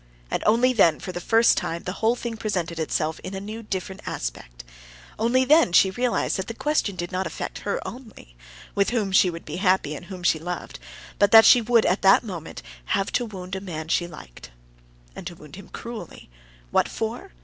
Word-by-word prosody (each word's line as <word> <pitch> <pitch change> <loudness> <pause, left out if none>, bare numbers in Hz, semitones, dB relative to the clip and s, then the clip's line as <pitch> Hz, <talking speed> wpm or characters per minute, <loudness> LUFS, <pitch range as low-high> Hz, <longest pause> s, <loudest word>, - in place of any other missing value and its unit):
And - - -1
only 240 +4 +4
then 170 -9 +4
for 185 - -6
the 175 - -6
first 225 +4 +4
time 170 +1 -4
the 180 - -3
whole 225 +2 +3
thing 235 -2 -5
presented 180 -7 -3
itself 160 0 -1
in 190 +1 -7
a - - -3
new, 215 +3 -7
different 190 -3 -5
aspect; - - -6 0.6
only 245 +4 +2
then 300 - +5
she 190 +2 +6
realized 245 +2 0
that 190 - -4
the 230 - -6
question 295 -10 0
did 175 0 -5
not 185 0 -2
affect - - -6
her - - 0
only—with 60 - -6
whom 220 -5 -1
she 190 -1 +5
would 170 -1 -8
be - - -6
happy, 185 -5 +2
and 175 - -9
whom 185 -1 -9
she 165 -2 +3
loved—but 170 - -3
that 225 0 +9
she 245 - +7
would 230 0 +3
have 185 - +1
that 195 +4 +6
moment 175 -8 -7 0.5
to 245 - +1
wound 190 -3 -7
a 190 - -5
man 170 -5 -5
whom 160 - -10
she 175 +1 +1
liked. 60 - -12 0.7
And - - -7
to 175 - -7
wound 150 -2 -13
him 195 -1 -12
cruelly. 225 - -9 0.4
What - - +3
for? 225 +1 -4
190 Hz, 200 wpm, -24 LUFS, 170-225 Hz, 0.7 s, that